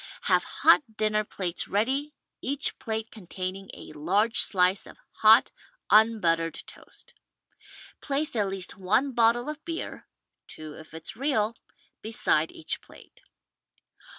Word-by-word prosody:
Have - - +3
hot 230 -8 +3
dinner 215 0 +1
plates 185 -4 -4
ready, 270 +8 -1 0.3
each 280 +1 -2
plate 220 -1 -4
containing 190 -1 -6
a - - -11
large 195 +10 +2
slice 185 0 +2
of - - -14 0.2
hot, 220 +3 +6 0.4
unbuttered 180 -7 +3
toast. - - -17 0.9
Place 290 0 -1
at 210 -3 +1
least 190 -1 -3
one 215 +9 +1
bottle 240 +1 +2
of 300 0 -6
beer 330 0 -6 0.2
— - - -60
two 155 -1 -9
if 155 +1 -13
it's 160 +5 -5
real 230 -4 0 0.3
— - - -38
^beside 215 -8 +1
each 160 - -5
plate. - - -18
215 Hz, 130 wpm, -27 LUFS, 185-240 Hz, 0.9 s, hot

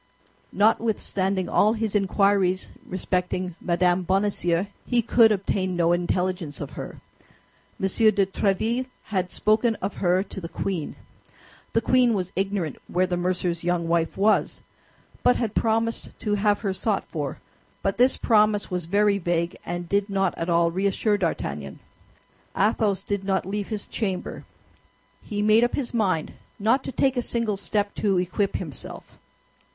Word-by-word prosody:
Notwithstanding 200 -3 +1
all 215 +5 +3
his 220 -2 -2
inquiries 195 -2 +2 0.2
respecting 180 0 -2
Mme. 175 +1 +2
Bonacieux, 185 -1 +1 0.2
he 240 -2 +1
could 230 0 +5
obtain 190 -2 -1
no 170 -1 +2
intelligence 175 -3 -1
of - - -6
her. - - -8 0.8
M. - - 0
de 205 0 +3
Tréville 220 +6 0 0.3
had 185 -2 0
spoken 220 +4 +2
of 195 0 -5
her 180 +1 +2
to 195 - -9
the 165 - -6
queen. 180 -6 -3 0.8
The 225 - +3
queen 250 -1 +3
was 185 -2 -2
ignorant 195 -6 -1
where 185 +1 +1
the 180 -1 -1
mercer's 175 -1 -1
young 175 -1 0
wife 165 -1 0
was, 210 +2 +2 0.6
but 250 - +4
had 225 -3 -2
promised 225 +1 -1
to 210 - -1
have 205 0 +2
her 200 -4 -1
sought 195 +2 -1
for; 145 -4 -4 0.5
but 195 +3 -1
this 255 +2 +4
promise 210 -3 +2
was 180 -2 -3
very 200 +2 +3
vague 170 -1 -1
and 175 0 -4
did 200 +2 0
not 195 -2 0
at 165 - -3
all 170 0 +3
reassure 200 +3 +1
D'Artagnan. 75 - -3 0.8
Athos 205 -1 +2
did 200 -1 -2
not 190 -1 0
leave 205 +1 -3
his 215 -3 -3
chamber; 190 -5 -4 0.8
he 205 -1 -3
made 215 +2 +5
up 240 - +1
his 255 -4 -3
mind 190 -9 0 0.2
not 230 +6 +2
to - - -4
take 265 +1 +1
a - - +2
single 230 -3 -1
step 205 +1 -1
to 200 -3 +1
equip 185 +3 0
himself. 150 -9 -7
195 Hz, 150 wpm, -25 LUFS, 180-215 Hz, 0.8 s, could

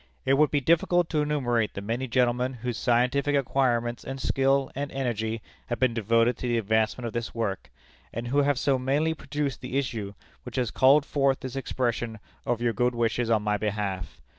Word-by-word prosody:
It 135 - +3
would 150 +2 +4
be 145 - +1
difficult 170 +3 +3
to 155 -3 +2
enumerate 125 -7 0
the 100 - -4
many 115 +6 -2
gentlemen 125 +1 +1
whose 120 -2 -1
scientific 125 +4 +2
acquirements 120 -3 +1
and 135 +1 -6
skill 135 +1 +1
and 140 +1 -4
energy 115 -4 -2 0.2
have 120 - -2
been 130 -2 +2
devoted 115 +2 +2
to 125 - -4
the 120 -1 +1
advancement 110 +2 0
of 115 - -4
this 120 0 -4
work, 105 -5 -3 0.4
and 120 +1 -5
who 140 +3 +2
have 145 -1 +2
so 135 -1 +1
mainly 145 +5 +1
produced 145 -2 -3
the 125 +1 -3
issue 110 -7 -3 0.3
which - - -9
has 125 -4 0
called 140 +3 +5
forth 140 -1 +1
this 130 -2 -6
expression 120 -4 -2 0.3
of 120 -1 0
your 120 -1 +2
good 125 +3 +1
wishes 115 0 0
on 110 -2 +2
my 105 0 +1
behalf. 100 -5 -3
125 Hz, 190 wpm, -27 LUFS, 115-135 Hz, 0.4 s, called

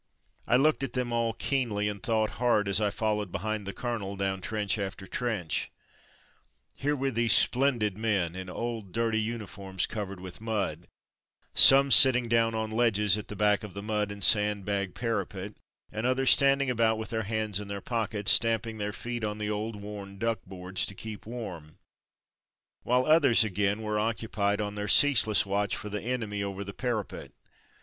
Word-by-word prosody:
I - - +3
looked 150 +4 +2
at 135 -3 -4
them 125 -2 -2
all 115 -1 0
keenly, 115 -6 -1
and 100 -2 -5
thought 110 0 0
hard 115 -5 +2
as 100 +2 +3
I 105 - +1
followed 105 -2 -2
behind 105 +1 -4
the - - -3
colonel 105 -3 -5
down 95 -1 -3
trench 105 0 -2
after 95 0 -5
trench. 105 -7 -3 1.1
Here 145 +2 -1
were 135 0 -2
these 115 -1 +4
splendid 120 -6 +3
men, 100 -6 -1
in 95 0 -7
old, 110 -2 -5
dirty 115 -1 0
uni 110 0 -4
forms 95 -2 -4
covered 100 -3 -6
with 90 +2 -10
mud; 100 -7 -3 0.7
some 135 0 +8
sitting 125 -2 +7
down 115 -1 +1
on 110 0 -3
ledges 105 -4 +2
at 105 - -6
the 105 - -7
back 105 0 +1
of 105 -4 -9
the 100 - -6
mud 105 -1 -2
and 100 0 -7
sand 105 -3 +4
bag 100 -2 -3
para 115 -1 -2
pet 100 +2 -8 0.4
and 110 +3 -3
others 130 0 +3
stand 140 0 +4
ing 130 - -1
about 115 -2 +1
with 110 +1 -6
their 110 -1 -1
hands 110 -1 -2
in 105 - -8
their 100 0 -5
pock 115 +1 -3
ets, 100 -1 +3
stamping 115 -1 +2
their 105 0 -3
feet 120 +2 -6
on 105 0 -3
the 105 0 -3
old 105 +1 -4
worn 100 -1 -9
'Muck 115 0 -1
boards'' 90 0 -2
to 100 - -5
keep 110 +1 -9
warm; 90 -10 -8 1.0
while 125 +1 +1
others, 150 -7 +5
again, 105 +1 -1
were 105 0 -2
^ - - 0
occupied 105 -2 -1
on 105 -1 -4
their 105 0 -5
ceaseless 110 -4 +4
watch 100 +1 -1
for 105 - -7
the 105 0 -4
enemy 110 -4 -3
over 100 0 -5
the 100 0 -8
parapet. 120 -5 -5
105 Hz, 190 wpm, -28 LUFS, 100-115 Hz, 1.1 s, some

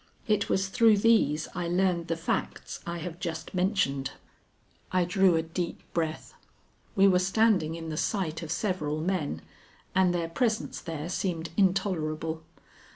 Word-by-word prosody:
It 210 -2 +1
was 195 0 +1
through 220 +1 +5
these 200 -8 +3
I 175 -1 -2
learned 175 -1 +1
the 165 - 0
facts 165 - -3
I 170 0 -3
have 170 +1 -6
just 165 -2 -5
mentioned." 180 -8 0 0.8
I 185 -1 +3
drew 185 -1 +4
a 160 - +1
deep 170 +1 -4
breath. 160 -2 -2 0.6
We 195 -1 +6
were 185 -2 +5
standing 190 -4 +2
in 165 -1 -6
the 155 - -4
sight 170 -5 -1
of 160 -2 -5
several 155 -7 -1
men, 170 -2 -2 0.5
and 185 -1 +4
their 170 -2 -1
presence 220 +5 -1
there 160 -2 -5
seemed 175 -3 -2
intolerable. 165 -5 0
175 Hz, 150 wpm, -28 LUFS, 160-190 Hz, 0.8 s, We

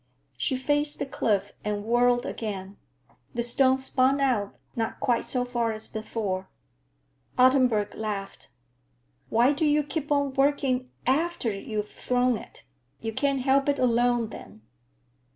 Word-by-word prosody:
She 260 - 0
faced 290 +3 +2
the - - -2
cliff 205 -6 0
and 210 -1 -2
whirled 245 +1 +3
again. 200 -3 -5 0.6
The 235 - 0
stone 260 +2 +3
spun 265 +1 +2
out, 240 -7 0 0.2
not 225 -2 -2
quite 240 -2 +1
so 250 -1 0
far 240 -2 -1
as 215 0 -7
before. 205 -4 -4 0.9
Ottenburg 250 -5 +4
laughed. 200 -6 -5 0.8
"Why 245 +5 +4
do 305 +3 -1
you 300 0 +3
keep 295 0 -4
on 285 -2 +1
working 270 -2 +1 0.2
after 300 -2 +1
you've 210 +1 -4
thrown 250 0 +1
it? - - -11 0.3
You 225 -1 -4
can't 275 +2 +1
help 275 +2 +3
it 285 - +2
along 240 -2 +2
then." 105 - -11
245 Hz, 135 wpm, -26 LUFS, 215-270 Hz, 0.9 s, Ottenburg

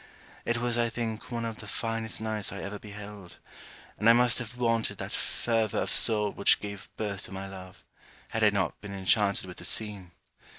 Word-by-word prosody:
It 120 - +1
was 120 0 +1
I 115 0 +3
think 115 -1 -3
one 115 -1 -1
of 115 -1 -4
the 110 - -9
finest 115 +1 -2
nights 110 -2 -2
I 100 - -5
ever 100 +1 -5
beheld; 105 -3 -9 0.6
and 110 - +5
I - - +10
must 120 0 +4
have 120 0 -6
wanted 115 -2 +1
that - - -5
fervour 115 -3 0
of - - 0
soul 105 -2 +4
which 100 - +5
gave 100 -1 -7
birth 100 -3 -2
to - - -10
my 95 0 -5
love, 95 -1 -10 0.4
had 110 - 0
I 105 - +8
not 95 -4 -1
been 100 -1 -6
enchanted 100 +1 +2
with 90 -1 -9
the - - -7
scene. 105 -4 0
105 Hz, 200 wpm, -29 LUFS, 100-115 Hz, 0.6 s, I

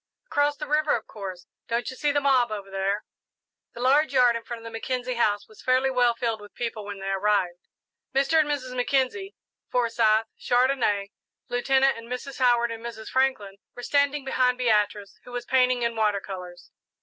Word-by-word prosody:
"Across 290 -9 +1
the 300 - -5
river, 300 +1 +2
of 225 - -5
course; 190 -4 -8 0.2
don't 235 +1 -1
you - - -9
see 295 +2 +1
the 290 - +2
mob 260 -5 +3
over 200 -2 -6
there?" 195 +2 -1 0.7
The 240 - -7
large 280 +3 +3
yard 245 -2 +5
in 230 - -3
front 235 +1 -6
of - - -15
the 230 - -8
Mackenzie 250 +2 -3
house 210 -3 0
was 215 - -16
fairly 260 +1 +2
well 245 -2 +3
filled 230 -2 -2
with 205 - -14
people 230 -3 -4
when 205 -1 -6
they 195 0 -3
arrived. 195 -3 +1 0.5
Mr. 275 +4 +3
and 300 -1 +2
Mrs. 260 -3 -3
Mackenzie, 270 +10 0 0.3
Forsyth, 225 -2 +2
Chandonnais, 245 -6 +1 0.4
Lieutenant 265 +1 +2
and 230 - -11
Mrs. 260 +2 -5
Howard, 240 -2 +3
and 230 0 -7
Mrs. 230 -2 -7
Franklin 260 -7 0 0.2
were 245 - -8
standing 285 0 +1
behind 255 -2 +2
Beatrice, 210 -4 0
who 250 - -12
was 245 -1 -4
painting 255 -1 +2
in 235 0 0
water 210 -2 +1
colours. 180 -3 -9
240 Hz, 185 wpm, -26 LUFS, 215-265 Hz, 0.7 s, yard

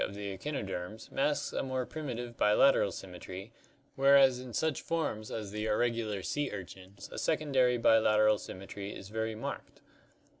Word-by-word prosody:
of 100 - -4
the 100 -1 -4
ectnnoderms 100 -5 -5
masks 145 +2 0
a - - 0
more 130 -1 -2
primitive 120 -6 -5
bilateral 105 0 +4
symmetry, 95 +2 -8 0.4
whereas 135 -2 +6
in 125 -1 -8
such 155 +4 0
forms 135 -10 -2
as 105 -3 -5
the 105 +1 -3
ir 105 - +2
regular 115 -5 0
sea 145 +6 -1
urchins 95 0 -9
a - - -5
secondary 135 -6 +2
bilateral 110 -2 +4
symmetry 100 +1 -7
is 95 - -10
very 110 0 -2
marked. 110 - -6
110 Hz, 150 wpm, -31 LUFS, 100-130 Hz, 0.4 s, whereas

